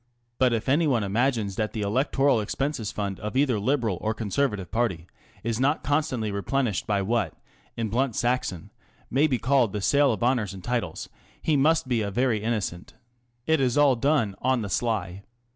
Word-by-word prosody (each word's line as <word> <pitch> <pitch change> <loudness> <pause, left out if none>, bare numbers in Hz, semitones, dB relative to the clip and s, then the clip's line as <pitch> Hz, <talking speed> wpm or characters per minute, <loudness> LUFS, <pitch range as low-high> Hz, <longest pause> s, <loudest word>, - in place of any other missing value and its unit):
But 130 -1 +4
if 115 -1 -1
anyone 140 -5 +2
imagines 105 -1 0
that 110 -1 -1
the 110 - -3
electoral 130 +3 +2
expenses 120 +1 -2
fund 100 -2 -4
of 105 +4 -4
either 130 -6 +2
Liberal 115 -5 0
or 110 0 -1
Conservative 105 -4 -1
party 110 -7 -1 0.4
is 115 0 -1
not 140 +4 +1
constantly 130 -7 0
replenished 105 +2 -1
by 100 -2 +1
what 115 +4 0 0.4
in 115 -1 -1
blunt 125 +2 0
Saxon 120 -8 -1 0.4
may 140 +5 +3
be 130 -4 0
called 120 -2 +2
the 105 - -2
sale 140 +5 +4
of 110 -2 -3
honours 120 -6 +1
and 95 - -10
titles, 115 -8 -2 0.3
he 155 - +1
must 150 +1 +3
be 120 -3 +1
a 100 - -2
very 115 0 +1
innocent. 105 -6 -3 0.5
It 160 -2 +2
is 125 -1 +1
all 145 -3 +5
done 135 -3 +1
t( 95 - -17
on 130 -2 +1
the 100 - -4
sly." 100 -4 -1
115 Hz, 180 wpm, -26 LUFS, 105-135 Hz, 0.5 s, all